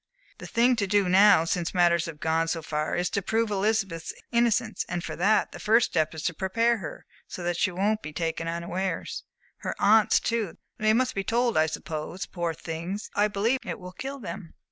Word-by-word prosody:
The - - -8
thing 245 +2 +3
to 200 -3 0
do 200 -1 +2
now, 190 -2 +6
since 170 +1 -2
matters 170 -1 +3
have 155 -3 -8
gone 160 +1 +1
so 165 -1 -2
far, 150 0 -2
is 175 +1 0
to 200 - 0
prove 225 +2 0
Elizabeth's 195 -4 -1 0.2
innocence, 235 -1 +1
and 175 -1 -3
for 155 - -5
that, 200 +5 +2
the - - -9
first 225 +2 +3
step 155 0 0
is 160 - -6
to 180 - 0
prepare 230 +7 +1
her, 190 - -8 0.2
so 180 - -7
that 175 0 0
she 185 - +1
won't 205 +4 0
be 155 - -7
taken 165 +1 -3
unawares. 170 +3 -3 0.3
Her - - -4
aunts 215 +1 +5
too 225 -7 -2 0.2
they 215 0 +3
must 255 +2 +1
be 195 - -2
told, 235 +3 +1
I 155 0 +4
suppose. 160 +3 -5
Poor 170 -2 -3
things, 170 +6 -5
I 205 +1 +3
believe 215 +6 0
it - - -4
will 180 -1 -9
kill 270 +8 -6
them!" 180 -5 -8
190 Hz, 205 wpm, -27 LUFS, 165-220 Hz, 0.3 s, now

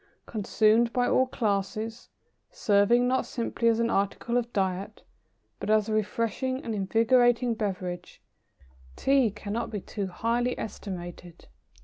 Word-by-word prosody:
Consumed 220 +2 +2
by 245 -1 +2
all 260 - +3
classes, 220 0 -2 0.4
serving 240 - +3
not 260 +1 +2
simply 235 -1 -2
as 230 0 +3
an 230 0 +1
article 200 +4 -1
of 240 -1 0
diet, 195 +1 -2 0.6
but 200 - -5
as 215 -1 +3
a - - -1
refreshing 230 +4 -1
and 230 - -3
invigorating 235 +4 +3
beverage, 185 -5 -4 0.8
Tea 270 -4 +3
cannot 210 +2 -4
be 210 -2 -4
too 200 +1 -5
highly 235 +6 -1
estimated. 175 -4 -8
220 Hz, 125 wpm, -27 LUFS, 200-240 Hz, 0.8 s, all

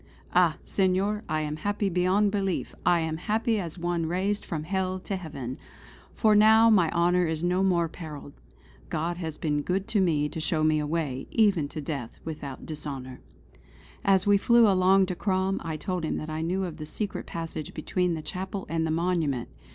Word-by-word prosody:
"Ah, 175 -3 +4
Senor, 195 +2 +1
I 155 0 0
am 150 0 -3
happy 205 +4 -1
beyond 190 +3 +2
belief. 195 -3 -1
I 175 -1 +4
am 160 -1 -2
happy 220 +5 0
as 170 -2 -5
one 170 -1 -1
raised 195 +5 -1
from 155 -4 -4
Hell 185 +2 -1
to 195 - -3
Heaven. 140 -8 -6 0.6
For 215 -2 +4
now 220 +2 +7
my 180 -6 +4
honour 175 +1 +2
is 160 0 -2
no 180 +1 +2
more 175 -3 +2
perilled. 150 -4 -9 0.6
God 170 +2 -2
has 160 -3 -5
been 150 -2 0
good 190 +6 -1
to 210 - +2
me 155 -5 +2
to 160 - -6
show 155 0 +1
a 155 -1 +2
way, 145 -5 -2
even 200 -9 +3
to 155 - -6
death, 140 -5 -5
without 145 -4 -6
dishonour." 140 -4 -6 0.8
As 195 -1 +3
we 205 -1 +5
flew 235 +1 +5
along 190 0 +4
to 185 - -3
Crom 190 0 0
I 160 -2 -3
told 180 +2 -3
him 160 - -1
what 155 +1 -5
I 155 +1 -3
knew 180 +4 -1
of 170 -4 -5
the 155 -2 -7
secret 205 +4 -4
passage 165 -2 -6
between 180 +2 0
the 155 - -6
chapel 190 +3 -4
and 165 -1 0
the - - -2
monument. 160 -6 0
175 Hz, 190 wpm, -27 LUFS, 155-190 Hz, 0.8 s, now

